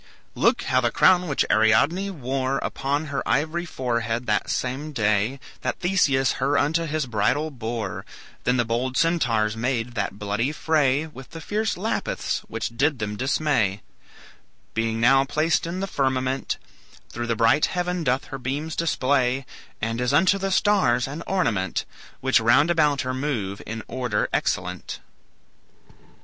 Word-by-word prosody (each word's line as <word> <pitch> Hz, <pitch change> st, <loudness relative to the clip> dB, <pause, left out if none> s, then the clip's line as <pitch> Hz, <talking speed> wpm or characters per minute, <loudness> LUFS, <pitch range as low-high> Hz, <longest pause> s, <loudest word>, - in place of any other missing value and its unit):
"Look -, -, +2 dB
how 130 Hz, 0 st, +2 dB
the 120 Hz, -, +2 dB
crown 180 Hz, +7 st, +4 dB
which 145 Hz, -, +1 dB
Ariadne 110 Hz, -, +3 dB
wore 135 Hz, -5 st, -2 dB
Upon 145 Hz, +3 st, -1 dB
her 140 Hz, -2 st, -3 dB
ivory 160 Hz, +4 st, 0 dB
forehead 120 Hz, -5 st, -2 dB
that 105 Hz, -2 st, 0 dB
same 135 Hz, +5 st, -2 dB
day 110 Hz, +2 st, +1 dB, 0.2 s
That -, -, -2 dB
Theseus 145 Hz, -8 st, +2 dB
her 140 Hz, +2 st, +2 dB
unto 160 Hz, +3 st, +1 dB
his 155 Hz, -1 st, -1 dB
bridal 125 Hz, +7 st, 0 dB
bore, 115 Hz, -6 st, -4 dB, 0.4 s
Then 125 Hz, +1 st, +2 dB
the 120 Hz, -, +2 dB
bold 125 Hz, +3 st, -1 dB
Centaurs 120 Hz, -11 st, +2 dB
made 120 Hz, 0 st, -2 dB
that 100 Hz, -3 st, -3 dB
bloody 105 Hz, +6 st, -1 dB
fray 150 Hz, -2 st, +2 dB
With 135 Hz, -4 st, -12 dB
the 165 Hz, -, -9 dB
fierce 210 Hz, +6 st, -1 dB
Lapiths 215 Hz, +5 st, -2 dB
which 115 Hz, +1 st, -4 dB
did 145 Hz, +3 st, +2 dB
them 105 Hz, -2 st, -3 dB
dismay; 130 Hz, -6 st, 0 dB, 0.9 s
Being 115 Hz, 0 st, -1 dB
now 135 Hz, +3 st, +5 dB
placed 155 Hz, +4 st, 0 dB
in 180 Hz, +3 st, -4 dB
the -, -, 0 dB
firmament, 130 Hz, -5 st, -1 dB, 0.5 s
Through 120 Hz, 0 st, -4 dB
the 115 Hz, -, 0 dB
bright 115 Hz, +7 st, +4 dB
heaven 180 Hz, -1 st, -2 dB
doth 130 Hz, -1 st, 0 dB
her 135 Hz, -, -4 dB
beams 145 Hz, +6 st, -3 dB
display, 135 Hz, -5 st, +1 dB, 0.4 s
And 115 Hz, +2 st, -1 dB
is 125 Hz, +2 st, 0 dB
unto 190 Hz, +5 st, +4 dB
the 195 Hz, 0 st, -1 dB
stars 160 Hz, -, +3 dB
an 145 Hz, +4 st, -6 dB
ornament, 105 Hz, -, 0 dB, 0.4 s
Which 130 Hz, -1 st, +4 dB
round 135 Hz, +8 st, +4 dB
about 150 Hz, -4 st, +2 dB
her 130 Hz, 0 st, -2 dB
move 120 Hz, -8 st, -3 dB
in 115 Hz, 0 st, -5 dB
order 125 Hz, -5 st, -1 dB
excellent." -, -, -2 dB
130 Hz, 150 wpm, -24 LUFS, 115-155 Hz, 0.9 s, now